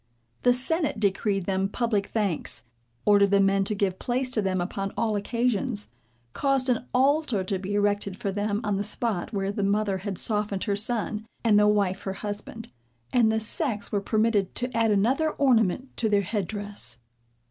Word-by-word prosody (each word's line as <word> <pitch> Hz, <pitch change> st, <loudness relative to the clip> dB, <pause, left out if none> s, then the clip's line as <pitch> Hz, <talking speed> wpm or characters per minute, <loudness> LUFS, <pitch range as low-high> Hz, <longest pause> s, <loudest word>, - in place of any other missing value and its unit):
The 245 Hz, -, +5 dB
senate 285 Hz, +2 st, +1 dB
decreed 195 Hz, -1 st, 0 dB
them 195 Hz, 0 st, 0 dB
public 215 Hz, -3 st, 0 dB
thanks, 200 Hz, -, -1 dB, 0.4 s
ordered 200 Hz, -1 st, +5 dB
the 200 Hz, 0 st, +4 dB
men 195 Hz, 0 st, +3 dB
to 210 Hz, -, -1 dB
give 195 Hz, -2 st, -1 dB
place 255 Hz, +1 st, 0 dB
to 225 Hz, -, +1 dB
them 190 Hz, -2 st, 0 dB
upon 195 Hz, +2 st, -3 dB
all 220 Hz, -2 st, +1 dB
occasions, 230 Hz, 0 st, -1 dB, 0.4 s
caused 275 Hz, -2 st, +1 dB
an 250 Hz, 0 st, 0 dB
altar 265 Hz, -5 st, +2 dB
to 190 Hz, 0 st, -2 dB
be 195 Hz, +2 st, -3 dB
erected 205 Hz, -1 st, 0 dB
for 200 Hz, -4 st, -2 dB
them 205 Hz, +1 st, -1 dB
on 205 Hz, -2 st, 0 dB
the 200 Hz, -, -1 dB
spot 215 Hz, -3 st, -1 dB
where 195 Hz, -2 st, -1 dB
the 205 Hz, -, -3 dB
mother 200 Hz, -1 st, +1 dB
had 195 Hz, -1 st, -4 dB
softened 210 Hz, -3 st, 0 dB
her 205 Hz, -2 st, 0 dB
son, 220 Hz, 0 st, -1 dB, 0.2 s
and 215 Hz, -3 st, +5 dB
the 210 Hz, -, +5 dB
wife 200 Hz, -2 st, +1 dB
her 195 Hz, -, -4 dB
husband; 210 Hz, +2 st, -7 dB, 0.4 s
and 230 Hz, -3 st, +4 dB
the 220 Hz, -, +1 dB
sex 220 Hz, -1 st, -1 dB
were 205 Hz, -, 0 dB
permitted 215 Hz, -2 st, +1 dB
to 250 Hz, -1 st, -2 dB
add 230 Hz, -1 st, +3 dB
another 245 Hz, +10 st, +2 dB
ornament 255 Hz, -2 st, +1 dB
to 225 Hz, -, +1 dB
their 205 Hz, -1 st, +3 dB
head 200 Hz, -1 st, -2 dB
dress. 205 Hz, -, -3 dB
210 Hz, 180 wpm, -26 LUFS, 195-230 Hz, 0.4 s, The